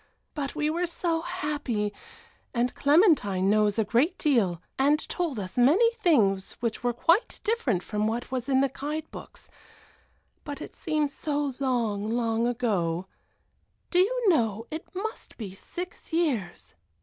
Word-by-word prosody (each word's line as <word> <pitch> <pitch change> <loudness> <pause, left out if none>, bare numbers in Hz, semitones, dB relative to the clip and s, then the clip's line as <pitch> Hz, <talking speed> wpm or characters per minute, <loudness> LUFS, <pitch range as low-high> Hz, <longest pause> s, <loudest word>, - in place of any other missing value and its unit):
But 285 -2 -4
we 300 0 0
were 350 +2 0
so 335 -1 -1
happy, 290 - -2 0.6
and 240 +1 +1
Clementine 280 - +4
knows 210 -1 +3
a 220 - +2
great 265 - +2
deal, 220 - +2 0.2
and 285 +3 +4
told 325 -10 -2
us 195 +5 -4
many 355 - +5
things 225 - +2
which 230 -2 -3
were 245 - +2
quite 335 - +2
different 285 - 0
from 210 0 -1
what 235 +3 -3
was 255 0 -3
in 265 -1 +4
the 275 -2 +1
guide 305 +3 -4
books - - -11 1.0
but 285 -2 -6
it - - -8
seems 305 -3 -1
so 290 -3 -2
long, 230 -6 0
long 230 0 +1
ago. 195 -8 0 0.9
Do 360 - +3
you 470 +5 +2
know 225 - +2
it 315 +2 -5
must 440 +5 -5
be 205 -5 -6
six 355 - -8
years." 290 - -1
265 Hz, 150 wpm, -27 LUFS, 220-325 Hz, 1.0 s, many